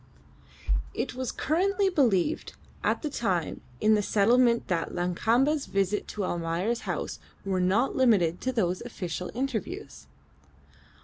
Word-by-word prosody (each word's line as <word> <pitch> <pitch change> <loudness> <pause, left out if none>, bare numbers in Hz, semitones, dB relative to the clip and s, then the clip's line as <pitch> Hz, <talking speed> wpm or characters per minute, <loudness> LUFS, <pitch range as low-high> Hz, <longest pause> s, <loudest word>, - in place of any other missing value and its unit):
It - - -2
was 255 0 -3
currently 390 +6 +1
believed 275 - +1 0.3
at - - +1
that 300 -2 -3
time 185 -8 -1 0.2
in 215 - +4
the 210 - +3
settlement 235 +4 +3
that 170 -3 -1
Lakamba's 230 - +1
visits 195 +1 0
to 205 -2 -1
Almayer's 175 +7 -2
house - - -4 0.3
were 190 -2 0
not 205 +9 +2
limited 195 -10 +3
to 260 - 0
those 185 -7 0
official 180 -7 -5
interviews. 250 -5 -4
220 Hz, 125 wpm, -28 LUFS, 180-255 Hz, 0.3 s, in